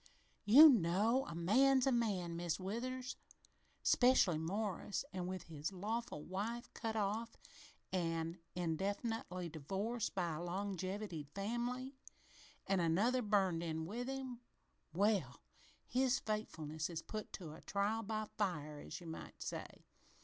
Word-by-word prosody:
"You 280 +10 +11
know, 225 - +4
a - - -6
man's 255 +10 +4
a 270 - +4
man, 200 -8 0
Mis' 170 0 -1
Withers 250 +7 -3 0.7
'specially 245 -10 +5
Morris, 200 - -2
an' 180 -1 -3
with 185 -2 -4
his 155 +1 -4
lawful 210 -2 -3
wife 225 +7 -4
cut 225 -1 -3
off 215 +2 -1 0.6
an' 165 -1 -1 0.2
indefinitely 185 +2 -2
divorced 195 +11 -2
by 175 -4 0
a 155 - -4
longevitied 185 -3 -3
family 245 +6 -2 0.7
an' 195 -1 +2
another 200 +10 +3
burned 195 -6 +2
in 160 -1 -2
with 235 +8 -4
him 265 -2 -4 0.5
well, 185 - +1 0.4
his 260 +1 +2
faithfulness 160 - -3
is 165 -2 -4
put 215 -1 -5
to 165 -5 -6
a 160 - -11
trial 205 +3 0
by 215 0 -2
fire, 155 -7 -1
as - - -7
you - - -10
might 160 -1 -8
say. - - -6
200 Hz, 130 wpm, -38 LUFS, 170-230 Hz, 0.7 s, You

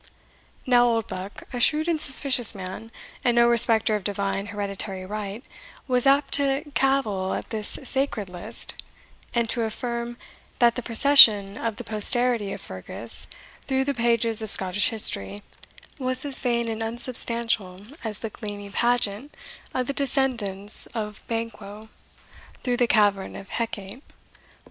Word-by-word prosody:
Now 245 -1 +4
Oldbuck, 205 -4 -4
a 245 - -4
shrewd 305 +6 +2
and 325 -3 -1
suspicious 265 -6 +6
man, 190 +4 -9 0.3
and 240 -2 +1
no 235 0 +4
respecter 225 -2 +4
of 210 - -4
divine 195 0 -3
hereditary 200 -1 -3
right, 210 +4 -7 0.4
was 250 0 0
apt 275 +1 +2
to 280 0 +1
cavil 240 -8 -1
at - - -8
this 215 -2 -3
sacred 265 -6 -2
list, 180 -1 -2 0.6
and 235 -1 0
to 240 - -2
affirm, 235 +1 -4 0.4
that 235 -1 +3
the 250 - -5
procession 225 -5 +7
of 225 -1 -4
the - - -8
posterity 220 0 +3
of - - -7
Fergus - - 0 0.4
through 265 -1 0
the 280 +1 -2
pages 230 -2 +1
of 220 - -6
Scottish 190 +1 +1
history, 205 -2 +1 0.6
was 255 +1 -3
as 275 -2 -3
vain 235 -2 -1
and 225 0 -5
unsubstantial 230 -4 0 0.2
as 215 -3 -4
the 225 -1 -7
gleamy 205 -2 -8
pageant 240 +3 -1 0.3
of 255 - -3
the 280 - -4
descendants 240 -8 -1
of 210 -2 -6
Banquo 220 -2 -7 0.7
through 245 -1 -1
the 245 -1 +1
cavern 205 -4 +1
of 195 - -11
Hecate. 225 0 -6
230 Hz, 140 wpm, -23 LUFS, 205-250 Hz, 0.7 s, procession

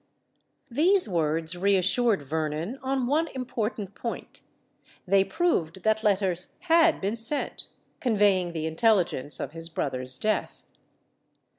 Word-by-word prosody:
These 355 +9 +4
words 165 -1 0
reassured 200 +2 +2
Vernon 160 - -3
on 265 -1 -1
one 305 +6 +1
important 225 -5 -4
point: 235 - -7 0.6
they 195 +1 +4
proved 190 - -1
that 220 0 +1
letters 190 -3 0
had 330 -1 +4
been 200 +3 -2
sent, 235 +6 -2 0.3
conveying 200 -7 +2
the 160 -1 -3
intelligence 165 - +1
of 135 - -4
his 165 +1 -3
brother's 130 -5 -1
death. 215 +8 -2
200 Hz, 115 wpm, -26 LUFS, 165-245 Hz, 0.6 s, These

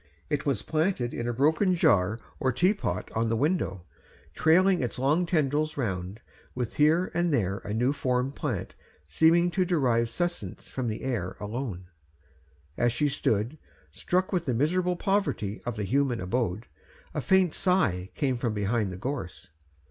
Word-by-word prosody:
It 150 0 -1
was 135 -7 0
planted 155 -6 0
in 120 - -3
a - - +1
broken 160 - +3
jar 100 - +3 0.2
or 130 - +1
teapot 180 - 0
on 115 +1 0
the 115 - +1
window, 125 - 0 0.5
trailing 180 +3 +4
its 125 - -3
long 150 +7 +2
tendrils 155 -2 0
around, 95 -3 -3 0.3
with 125 -2 -4
here 155 +4 +3
and 175 0 +1
there 100 -8 0
a 105 - -7
new 120 +6 +1
formed 130 -1 0
plant - - -3 0.3
seeming 165 - +4
to 185 - +1
derive 125 -10 +1
sustenance 170 - -4
from 130 -2 -3
the 110 -1 -4
air 115 -9 -2
alone. 105 -4 -4 0.9
As 120 0 +3
she 145 +5 +1
stood, 115 +2 0 0.3
struck 185 +2 -1
with 175 -2 0
the 125 - 0
miserable 180 +7 +1
poverty 195 - -1
of 120 - -2
the 105 - -3
human 130 +2 +1
abode, 110 +2 -1 0.5
a - - -2
faint 190 -3 +3
sigh 105 - +1
came 130 -5 0
from 120 -3 -1
behind 105 0 0
the 90 - -7
gorse. 100 - -5
130 Hz, 160 wpm, -27 LUFS, 110-165 Hz, 0.9 s, trailing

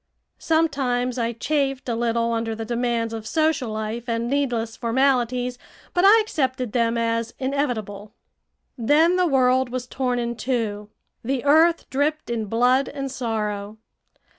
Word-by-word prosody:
Sometimes 260 -6 0
I 230 0 0
chafed 270 +2 -1
a 240 - 0
little 230 0 0
under 225 -1 -2
the 225 0 -5
demands 235 -1 -1
of 220 -1 -6
social 315 -5 +1
life 220 +2 -4
and 230 0 -1
needless 240 -5 -1
formalities, 250 0 0 0.3
but 355 - +2
I 415 +3 +8
accepted 260 - -1
them 230 0 +1
as 230 0 -1
inevitable. 225 -7 -3 0.6
Then 310 +9 +4
the 365 -1 +2
world 260 -2 +3
was 250 0 -4
torn 250 -1 -2
in 235 0 -2
two. 215 -5 -2 0.3
The 260 +2 -2
earth 325 +4 +4
dripped 290 0 -1
in 225 -2 -2
blood 245 +5 +2
and 275 -1 -5
sorrow. 215 -4 -3
245 Hz, 140 wpm, -23 LUFS, 230-275 Hz, 0.6 s, I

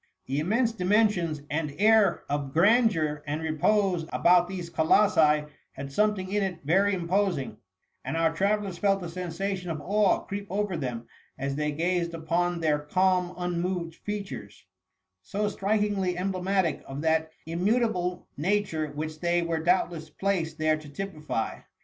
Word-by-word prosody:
The 135 +2 -1
immense 225 +9 +1
dimensions 185 -7 +1
and 150 -1 -2
air 215 -3 +4
of 140 -1 -3
grandeur 175 -6 +3
and 150 +2 -2
repose 175 +3 +1
about 175 0 +4
these 180 -2 -5
colossi 160 -2 +4 0.3
had 135 +1 -7
something 200 +2 +1
in 205 0 +1
it 185 -3 -3
very 195 +6 +3
imposing; 180 -4 -1 0.5
and - - -3
our 165 -1 +2
travellers 200 0 0
felt 195 -2 +2
a 170 - -5
sensation 180 +2 -4
of 160 -2 -3
awe 205 +3 +2
creep 200 0 -6
over 205 -1 -1
them 125 -6 -4 0.3
as 135 0 -2
they 150 +1 -1
gazed 170 +2 -1
upon 170 +2 -1
their 150 -2 +2
calm 180 +3 +1
unmoved 175 -1 -2
features, 140 - -7 0.6
so 200 - -2
strikmgly 205 -2 0
emblematic 185 -2 0
of 135 +2 -5
that 160 0 +1 0.2
immu 180 +8 +1
table 180 -7 -1
nature 165 -1 0
which 155 +1 -5
they 175 0 +1
were 165 -1 -1
doubtless 170 -2 0
placed 165 -2 -1
there 155 0 +2
to 155 -1 -11
typify. 150 - -4
175 Hz, 145 wpm, -27 LUFS, 155-195 Hz, 0.6 s, air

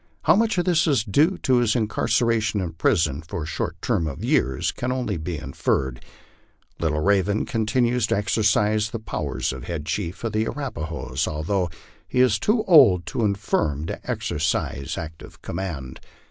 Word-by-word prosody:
How - - +5
much 225 -1 +2
of 175 - +1
this 175 -2 +3
is 135 -8 +3
due 150 - +2
to 130 -1 +3
his 120 -2 +2
incar 110 -3 -1
ceration 115 -2 +2
in 90 -4 -3
prison 80 -2 +1
for 80 0 -5
a - - -5
short 80 - -4
term 80 - +1
of 70 -3 -6
years 65 0 +1
can 125 +1 -3
only 125 -5 -1
be 80 +1 -4
inferred. 65 -2 -2 0.8
LitfJs 80 - +1 0.3
Iw'v - - 0
ven 100 +2 -1
continues 120 +1 +1
to - - +1
exercise 105 0 +2
the 115 - -4
powers 70 - -3
of 65 - -8
head 80 -4 -4
chief 90 +4 -3
of 115 - -1
the 110 +1 +1
Arapnhoes, 80 - -3
although 85 +4 -1 0.4
he 125 - -1
is 125 -5 +4
too 215 +1 +2
old 135 - +6
and - - -1
infirm 80 -8 0
to - - -6
exercise 75 -3 -2
active 80 0 -9
command. 80 -8 -5
100 Hz, 175 wpm, -24 LUFS, 80-120 Hz, 0.8 s, old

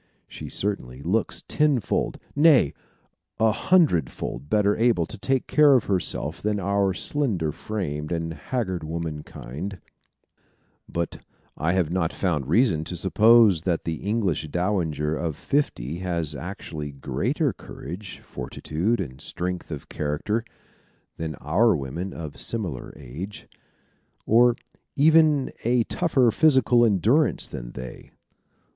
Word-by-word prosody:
She - - -8
certainly 70 -10 -4
looks 105 +6 0
tenfold 150 -7 +1 0.2
nay, 145 - +5 0.7
a 110 0 +4
hundredfold 85 - +1
better 105 -1 +3
able 115 -7 +2
to - - -8
take 135 +4 0
care 150 -2 +5
of 125 - +3
herself 85 -4 -2
than 105 0 0
our 100 0 +1
slender 95 - -1
framed 75 -5 -4
and 80 -1 -2
haggard 95 -4 -3
womankind; 80 +2 -6 1.1
but 85 -1 -3 0.3
I 85 +3 0
have 90 -4 +1
not 85 -2 0
found 75 -8 -1
reason 85 - +3
to 90 - -5
suppose 105 0 +5
that 85 -1 -1
the 80 -1 -2
English 100 -7 -1
dowager 80 -3 -1
of 80 -2 -2
fifty 85 - -1
has 85 -4 -1
actually 80 -3 -6
greater 70 - -1
courage, 90 +6 -9
fortitude, 80 - -2
and 65 +2 -5
strength 90 +2 -3
of 75 -4 -6
character 75 +10 -2 0.7
than 80 -2 -4
our 95 - +3
women 80 +7 -4
of 80 -5 -7
similar 95 - -3
age, 75 +9 -8 0.8
or 120 +2 +5 0.4
even 155 -1 +4
a 120 +1 +3
tougher 135 -6 +2
physical 130 -4 +4
endurance 115 - +3
than - - -8
they. 65 0 -9
90 Hz, 120 wpm, -25 LUFS, 80-115 Hz, 1.1 s, nay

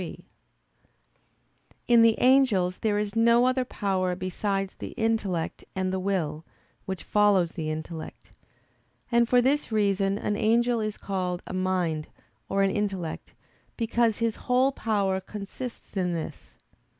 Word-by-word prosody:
3: - - -8 1.6
In 235 -1 +6
the 230 -1 +6
angels 245 -9 +3
there 210 -2 +1
is 210 0 -2
no 235 +2 +5
other 255 0 +2
power 190 -6 -1
besides 195 +1 -2
the - - -6
intellect, 215 -7 -1
and 185 0 -1
the 190 - -1
will, 170 -5 -2 0.4
which 190 -5 -4
follows 205 -5 +3
the 160 -3 -4
intellect. 155 +1 -7 0.8
And 235 0 +3
for 250 -1 +5
this 280 0 +1
reason 200 -2 +1
an 210 - -1
angel 235 +3 +2
is 215 -1 -3
called 180 -2 -3
a - - -7
"mind" 180 -4 -1 0.4
or 195 0 +2
an 195 - +2
"intellect"; 195 -6 -3 0.4
because 230 -1 +1
his 230 -1 -1
whole 255 +2 +4
power 200 -6 0
consists 210 +5 -8
in 180 -2 0
this. 165 -2 -7
200 Hz, 140 wpm, -27 LUFS, 185-230 Hz, 1.6 s, In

